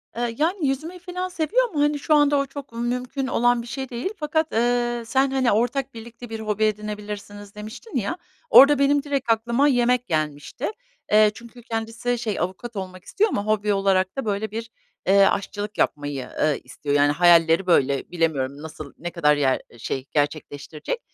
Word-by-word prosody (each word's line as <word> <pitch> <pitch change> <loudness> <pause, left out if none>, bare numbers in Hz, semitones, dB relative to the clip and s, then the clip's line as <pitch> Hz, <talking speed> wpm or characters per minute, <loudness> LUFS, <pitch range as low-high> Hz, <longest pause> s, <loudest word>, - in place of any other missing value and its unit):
Eee, 235 -1 -2
yani, 325 -1 +1
yüzmeyi 315 +7 -3
filan 360 +1 -4
seviyor 430 +10 +1
ama, 305 -8 -4
hani, 295 0 +2
şu 305 - +1
anda 290 -1 +4
o 275 - +1
çok 275 -3 -10
mümkün 250 +3 -2
olan 240 -1 +2
bir 235 - -10
şey 265 +1 -5
değil 245 +9 -3
fakat, 315 +1 -1
eee, 240 +1 +1
sen, 265 +3 +1
hani, 260 -3 +2
"Ortak, 245 +5 0
birlikte 235 +1 -10
bir 225 - -5
hobi 215 -1 -1
edinebilirsiniz." 210 -1 -4
demiştin 215 - -9
ya, 220 - -2 0.3
orada 280 - +8
benim 280 0 +3
direkt 275 -5 -1
aklıma 235 +5 +2
yemek 250 -1 +2
gelmişti. 155 - -2 0.4
Eee, 215 0 +6
çünkü 235 0 -13
kendisi 230 +2 -2
şey, 220 -4 -2
avukat 190 +7 -4
olmak 185 -2 -7
istiyor 430 +2 +1
ama 205 - -2
hobi 210 -1 +1
olarak 195 +1 +1
da, 270 - -2
böyle, 210 0 -2
bir, 225 +1 -5 0.4
eee, 195 +1 +6
aşçılık 205 +2 -2
yapmayı, 145 -3 -1
ııı, 150 -1 +2
istiyor, 145 -1 -3
yani 145 0 +4
hayalleri 170 +1 +5
böyle. 140 -4 +2
Bilemiyorum 145 -5 -1
nasıl, 155 -2 -9
ne 175 +1 -5
kadar 150 -4 +3
yer 135 -3 +1 0.2
şey, 130 +3 -4
gerçekleştirecek, 150 - -3
225 Hz, 175 wpm, -23 LUFS, 185-270 Hz, 0.4 s, orada